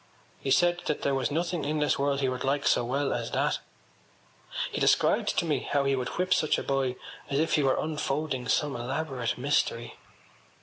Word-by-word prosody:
He - - -4
said 175 +5 +3
that 150 - -1
there 140 - +1
was 135 -2 0
nothing 170 +2 -1
in 150 +2 -1
this 150 -3 +1
world 140 0 +1
he 135 - +2
would 125 -1 -2
like 140 +1 0
so - - +3
well 135 +4 0
as - - -3
that. - - +1 1.1
He - - -3
described - - +3
to - - +2
me 150 -5 +1
how 140 +2 0
he 135 0 +2
would 125 -1 -2
whip 185 +1 +2
such 155 - +2
a - - -3
boy 135 -2 0 0.3
as 140 - 0
if 160 +2 +1
he 150 - +4
were 135 -2 +2
unfolding 150 -4 -2
some 145 -2 +1
elaborate 130 0 -2
mystery. 125 -3 0
140 Hz, 200 wpm, -28 LUFS, 130-155 Hz, 1.1 s, he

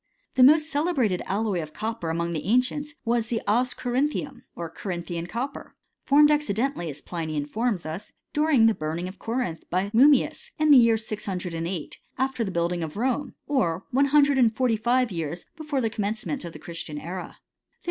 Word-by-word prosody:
The 260 - +2
most 305 +4 +7
celebrated 285 - +1
alloy 200 -3 0
of 155 -1 -8
copper 220 -6 -3
among 170 +1 -1
the 155 -2 -4
ancients, 255 +7 +1
was 235 -1 +1
the 230 -1 -1
as 245 +4 +2
corinthium, 270 +1 -1
or 170 - -4
Corinthian 170 0 -5
cop* 245 +9 -3
per, - - -11 0.3
formed 295 +2 +6
accidentally, 270 - 0
as 145 0 -8
Pliny 160 -3 -4
informs 200 +7 -1
us, 165 +7 -6 0.2
during*. 300 -6 +4
the 225 - +5
burning 160 +1 -3
of 185 +1 -10
Corinth 225 -9 -3
by 185 +3 0
Mummius 290 - +4
in 310 -1 +3
the 280 - +10
year 230 -1 +5
608^ 180 -6 -4 0.2
after 265 -2 0
the 205 - -2
building 170 -1 -1
of 160 +2 -5
Rome, 260 +4 -1
or 180 - 0
one 275 +3 +4
hundred 285 -1 +4
and 230 -3 +4
forty 245 -1 +2
five 240 +2 +1
years 165 0 -4
before 300 -4 -2
the 225 -2 0
commencement 220 +6 -3
of 170 - -7
the - - -8
Christian 165 -3 -7
era. 175 +4 -6
220 Hz, 180 wpm, -26 LUFS, 175-265 Hz, 0.3 s, the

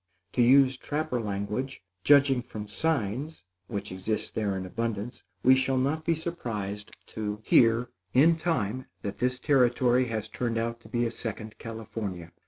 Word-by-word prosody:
To 125 - +2
use 130 +1 +6
trapper 145 -3 -2
language, 105 +5 -3 0.2
judging 140 -3 +5
from 110 -4 -7
"signs" 135 - -1 0.2
which 100 -3 -4
exist 95 +4 -2
there 100 -3 -1
in 95 - -4
abundance, 115 +3 -3 0.2
we 130 - +7
shall 130 0 +2
not 150 +5 0
be 165 - +2
surprised 110 - -4
to 105 -1 -4
hear, 120 +1 +4 0.2
in 155 +8 +5
time, 130 - -1 0.2
that 100 -2 -4
this 125 +1 +1
territory 125 -2 +3
has 110 -3 -3
turned 115 +1 -2
out 115 +1 -2
to - - -16
be 120 -1 0
a 115 - -1
second 110 -2 -6
California. 105 -6 -6
120 Hz, 155 wpm, -28 LUFS, 105-130 Hz, 0.2 s, we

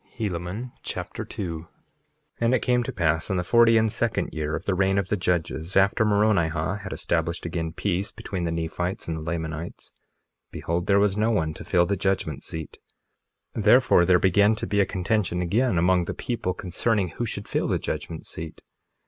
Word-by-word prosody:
Helaman 100 +3 -3
Chapter - - -5
2 85 -5 -5
2:1 80 - -13 0.7
And 115 +2 +3
it - - 0
came 125 -1 +2
to 120 - -3
pass 80 -3 0
in 95 - 0
the 90 - 0
forty 115 +4 +5
and 110 -1 +2
second 115 0 -1
year 75 0 -2
of - - -6
the 100 - +1
reign 95 +1 +2
of 95 -2 0
the - - +2
judges, 90 -2 -1
after 100 +4 +4
Moronihah 100 -4 +1
had 95 -2 -7
established 85 0 -1
again 80 -1 -3
peace 95 +3 -1
between 95 -3 -5
the 85 - -1
Nephites 85 +3 -3
and 80 - -2
the - - -6
Lamanites, 80 0 -5 0.6
behold 85 +1 -3
there 100 0 +5
was 100 0 +2
no 110 +2 +2
one 80 -8 0
to - - -9
fill 90 -2 +3
the 100 - 0
judgment 95 -6 -1
seat; 80 -1 -7 0.7
therefore 110 -2 +5
there 90 0 +5
began 100 +4 +4
to - - -4
be 100 - 0
a 100 - +3
contention 95 -2 0
again 100 +5 +1
among 90 +1 +3
the - - -4
people 110 -7 -3
concerning 95 +1 0
who 120 +8 -4
should 100 -1 -5
fill - - -1
the - - +1
judgment 80 - -5
seat. 80 -1 -8
95 Hz, 190 wpm, -25 LUFS, 85-105 Hz, 0.7 s, forty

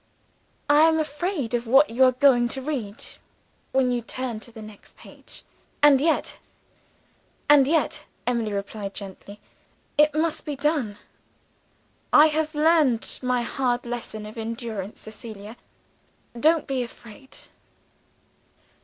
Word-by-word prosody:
I 300 +2 +6
am 320 0 +3
afraid 300 - -2
of 240 -1 -1
what 270 +4 +5
you 250 +3 +3
are 255 - +5
going 250 -2 +4
to 265 +2 -4
read, 240 -8 -4 0.7
when 260 -1 +2
you 245 -1 -1
turn 240 -1 -4
to 235 - -10
the 225 -1 -10
next 215 -1 -14
page. - - -13 0.4
And 280 -2 +7
yet 320 +1 0 0.5
" - - -38
"And 280 -2 +6
yet," 320 +2 0 0.2
Emily 235 -3 -1
replied 200 0 -5
gently, 200 0 -9 0.6
"it 300 0 +5
must 315 0 0
be 295 - -4
done. 275 -7 -1 1.1
I 305 +1 +7
have 310 0 -2
learned 300 -6 +2
my 250 -1 0
hard 245 0 -1
lesson 235 -3 -5
of 215 +2 -9
endurance, 225 -3 -5
Cecilia, 215 0 -10 0.8
don't 315 +3 +3
be 265 -2 -2
afraid." 235 +2 -11
250 Hz, 130 wpm, -24 LUFS, 225-295 Hz, 1.1 s, And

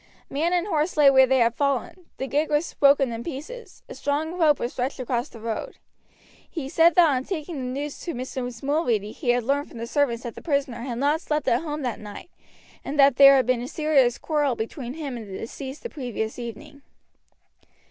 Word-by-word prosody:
Man 320 +5 0
and 355 0 +1
horse 325 -3 -1
lay 285 -2 +7
where 265 -1 +6
they 265 +1 +3
had 235 -2 +3
fallen, 280 +6 -2
the 265 - -3
gig 295 +3 0
was 300 +3 0
broken 275 -3 +4
in 230 0 -5
pieces, 335 - -8
a - - -8
strong 300 +3 -2
rope 315 -5 +3
was 240 - -3
stretched 260 +3 -3
across 245 +1 -2
the 230 - -12
road. 230 - -5 0.7
He 290 -6 -5
said 330 +2 +4
that 350 -2 +7
on 260 -1 0
taking 320 -1 -5
the 255 +1 -4
news 295 -1 -6
to 340 - -5
Mrs. 250 -1 -5
Mulready 245 -8 0
he 255 0 -5
had 245 0 +3
learned 280 +4 0
from - - -12
the 230 - -4
servants 245 -2 0
that 235 -2 -5
the - - -10
prisoner 280 -6 -1
had 240 -1 -4
not 290 +5 +1
slept 300 -3 -2
at 235 - +3
home 300 -2 -4
that 245 -3 -3
night, 210 +11 -10 0.5
and 290 +1 -4
that 275 -2 +6
there 275 0 +9
had 260 -2 +3
been 250 -1 +1
a 245 - -5
serious 275 -5 +2
quarrel 295 -5 0
between 240 +3 -5
him 285 -6 -5
and 220 -3 -8
the 190 - -6
deceased 265 +4 -7
the - - -3
previous 245 - -5
evening. 280 +5 -8
275 Hz, 215 wpm, -24 LUFS, 245-300 Hz, 0.7 s, there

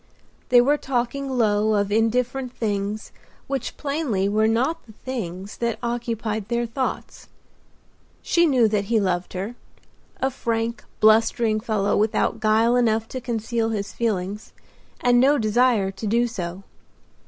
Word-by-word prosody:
They 245 -1 +7
were 285 +4 +3
talking 270 +1 -2
low, 215 -4 +2
of 200 0 0
indifferent 245 +4 0
things 205 -1 -3 0.3
which 270 -3 -4
plainly 280 -10 -1
were 215 +2 +2
not 260 +9 0
the 220 - -13
things 200 -6 -6
that 235 -1 -1
occupied 230 -3 -2
their 235 0 0
thoughts. 255 +3 -4 1.0
She 340 -1 +3
knew 255 -6 +4
that 205 -2 0
he 225 +2 +2
loved 180 -3 -1
her—a 230 +6 -7
frank, 230 -1 -2 0.2
blustering 220 0 +4
fellow 215 -3 0
without 215 +1 +1
guile 225 +2 +3
enough 225 -2 +2
to 255 - -5
conceal 230 -1 -1
his 205 -3 -3
feelings, 210 -2 -3 0.5
and 245 0 +4
no 280 +4 +5
desire 220 -3 +2
to 195 +3 -6
do 235 +3 +2
so. 185 -5 -5
225 Hz, 135 wpm, -23 LUFS, 210-245 Hz, 1.0 s, They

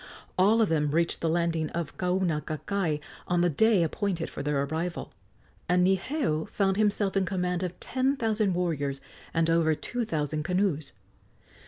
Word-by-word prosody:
All 215 +5 +4
of 215 - 0
them 150 -2 +1
reached 165 +3 0
the 165 - +1
landing 165 -1 0
at 170 -3 -3
Kaunakakai 180 -1 -1 0.3
on 175 -1 +2
the 175 -1 +3
day 215 +3 +4
appointed 170 +1 -2
for - - -5
their 140 -1 0
arrival, 160 +4 -3 0.6
and 180 0 +4
Niheu 190 - 0
found 195 -2 +1
himself 205 -2 +1
in 195 - +3
command 180 -1 -1
of 180 -1 -4
ten 265 +2 0
thousand 215 -5 +1
warriors 145 -6 -1 0.3
and 165 0 +1
over 165 -1 +3
two 245 +9 -3
thousand 155 -6 -2
canoes. 175 -3 0
175 Hz, 155 wpm, -28 LUFS, 160-195 Hz, 0.6 s, All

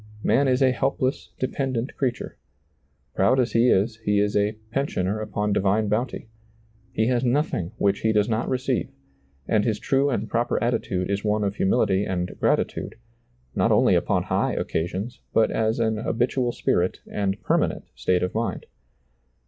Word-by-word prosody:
Man 140 +3 +3
is 130 +1 +3
a 130 - +5
helpless, 130 +1 -1
de 130 - 0
pendent 130 -2 -3
creature; 125 -3 -2 0.8
proud 120 +8 +3
as 125 - +1
he 115 +2 +4
is, 110 +3 +2
he 105 -2 +1
is 105 0 +1
a 105 +1 +2 0.2
pen 135 +3 0
sioner 95 +1 -2
upon 105 -1 -1
divine 100 +2 +1
bounty; 115 +2 -2 0.6
he 110 - +1
has 125 +1 +1
nothing 125 - 0
which 100 0 +1
he 110 - +1
does 105 -1 +2
not 115 0 -1
receive; 130 0 -1 0.6
and 110 -2 +2
his 110 -2 0
true 135 +1 +1
and 130 - -1
proper 120 +1 0
attitude 95 -6 -1
is 100 0 -1
one 105 0 +1
of 100 0 -2
humility 95 0 +2
and 90 -2 -3
gratitude, - - 0 0.6
not - - +2
only - - +4
upon - - +1
high - - 0
occasions, 95 +9 -3
but 110 - +3
as 110 +1 0
an 110 -1 +1
habitual 120 +3 0
spirit 90 -5 0
and 100 -1 -2
permanent - - 0
state 90 -1 0
of 90 - -2
mind. 115 +1 -2
110 Hz, 165 wpm, -24 LUFS, 100-125 Hz, 0.8 s, a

